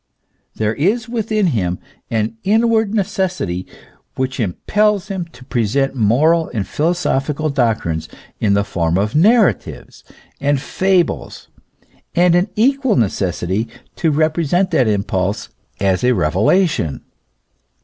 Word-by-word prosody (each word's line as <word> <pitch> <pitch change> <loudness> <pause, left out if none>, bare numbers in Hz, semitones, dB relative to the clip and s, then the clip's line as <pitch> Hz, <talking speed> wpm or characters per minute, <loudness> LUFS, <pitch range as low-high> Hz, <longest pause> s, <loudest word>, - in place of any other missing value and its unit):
There 110 0 0
is 215 - 0
within 220 -3 0
him 90 -5 -1 0.3
an 110 0 -1
inward 220 0 +2
necessity 185 - -2 0.5
which 130 +1 -2
impels 205 - 0
him 190 -3 -3
to 130 -6 -16
present 125 +4 0
moral 145 +8 +2
and 100 -3 -1
philosophical 155 - -1
doctrines 110 - -1 0.3
in 100 -2 +2
the 100 - +2
form 85 -4 -1
of 105 +3 0
narratives 210 +6 +1 0.4
and 145 0 +1
fables, 185 +4 -1 0.7
and 175 0 +4
an 175 +4 +2
equal 265 +2 +2
necessity 95 -1 -1 0.3
to 160 - +1
repre 155 +2 +1
sent 185 +5 +1
that 125 - +3
impulse 100 -1 -1 0.3
as 95 -2 +1
a 125 0 +4
revelation. 95 - +1
140 Hz, 120 wpm, -18 LUFS, -, 0.7 s, and